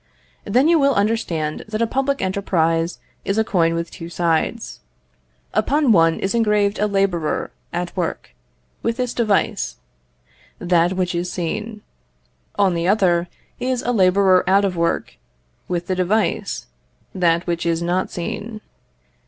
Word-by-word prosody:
Then 250 Hz, +8 st, +3 dB
you 335 Hz, -1 st, +4 dB
will 280 Hz, -2 st, +3 dB
understand 200 Hz, -8 st, -1 dB
that 215 Hz, 0 st, -3 dB
a -, -, +3 dB
public 270 Hz, +1 st, -1 dB
enterprise 170 Hz, -3 st, 0 dB, 0.3 s
is 195 Hz, -, -1 dB
a 220 Hz, -, +4 dB
coin 165 Hz, -5 st, +1 dB
with 170 Hz, 0 st, -3 dB
two 165 Hz, -, -8 dB
sides. 170 Hz, -2 st, -1 dB, 0.7 s
Upon 290 Hz, -2 st, +2 dB
one 165 Hz, -4 st, +4 dB
is 195 Hz, -, -1 dB
engraved 210 Hz, -3 st, +2 dB
a 210 Hz, -, +2 dB
labourer 195 Hz, -6 st, 0 dB, 0.2 s
at 175 Hz, 0 st, -4 dB
work, 170 Hz, -, -3 dB, 0.5 s
with 230 Hz, +1 st, -1 dB
this 250 Hz, -2 st, -2 dB
device, 215 Hz, -5 st, 0 dB, 0.8 s
that 175 Hz, 0 st, +2 dB
which 185 Hz, -1 st, -1 dB
is 175 Hz, +1 st, -2 dB
seen; 210 Hz, +5 st, -4 dB, 0.7 s
on 195 Hz, -3 st, +3 dB
the 170 Hz, 0 st, -1 dB
other 180 Hz, -4 st, +2 dB, 0.3 s
is 250 Hz, 0 st, -1 dB
a 245 Hz, -, 0 dB
labourer 190 Hz, -3 st, +4 dB
out 200 Hz, +1 st, +4 dB
of 190 Hz, -2 st, -1 dB
work, 170 Hz, 0 st, -1 dB, 0.5 s
with 175 Hz, -1 st, -2 dB
the 185 Hz, -, -1 dB
device, 185 Hz, -, 0 dB, 0.5 s
that 170 Hz, -2 st, +2 dB
which 170 Hz, -1 st, -2 dB
is 165 Hz, 0 st, 0 dB
not 180 Hz, +2 st, 0 dB
seen. 215 Hz, +4 st, -5 dB
190 Hz, 145 wpm, -21 LUFS, 170-215 Hz, 0.8 s, you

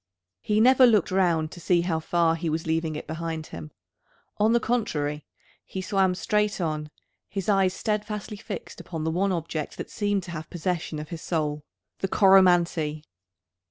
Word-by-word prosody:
He 210 Hz, -, 0 dB
never 255 Hz, +2 st, +7 dB
looked 215 Hz, -7 st, +3 dB
round 170 Hz, -4 st, +2 dB
to 175 Hz, -, -10 dB
see 175 Hz, 0 st, +2 dB
how 170 Hz, -2 st, -1 dB
far 165 Hz, 0 st, +2 dB
he 165 Hz, 0 st, -2 dB
was 160 Hz, +1 st, -2 dB
leaving 160 Hz, -1 st, -1 dB
it 150 Hz, -, -6 dB
behind 160 Hz, -1 st, -4 dB
him. 80 Hz, -2 st, -7 dB, 0.7 s
On 215 Hz, +2 st, +3 dB
the 235 Hz, -, +4 dB
contrary, 150 Hz, -12 st, -1 dB, 0.4 s
he 190 Hz, -, -7 dB
swam 190 Hz, -1 st, +1 dB
straight 210 Hz, +2 st, 0 dB
on, 155 Hz, -3 st, -2 dB, 0.4 s
his 195 Hz, -3 st, -4 dB
eyes 195 Hz, -3 st, +3 dB
steadfastly 210 Hz, -1 st, -3 dB
fixed -, -, -7 dB
upon 165 Hz, -3 st, -5 dB
the 160 Hz, -, 0 dB
one 190 Hz, +4 st, +1 dB
object 165 Hz, -3 st, -3 dB
that -, -, -6 dB
seemed 205 Hz, -2 st, 0 dB
to 175 Hz, -, -8 dB
have 155 Hz, -1 st, -6 dB
possession 170 Hz, -2 st, -3 dB
of 150 Hz, 0 st, -7 dB
his 170 Hz, -2 st, -6 dB
soul, 150 Hz, -3 st, -1 dB, 0.4 s
the 195 Hz, -, -1 dB
Coromantee! 175 Hz, -6 st, +4 dB
175 Hz, 170 wpm, -26 LUFS, 160-195 Hz, 0.7 s, never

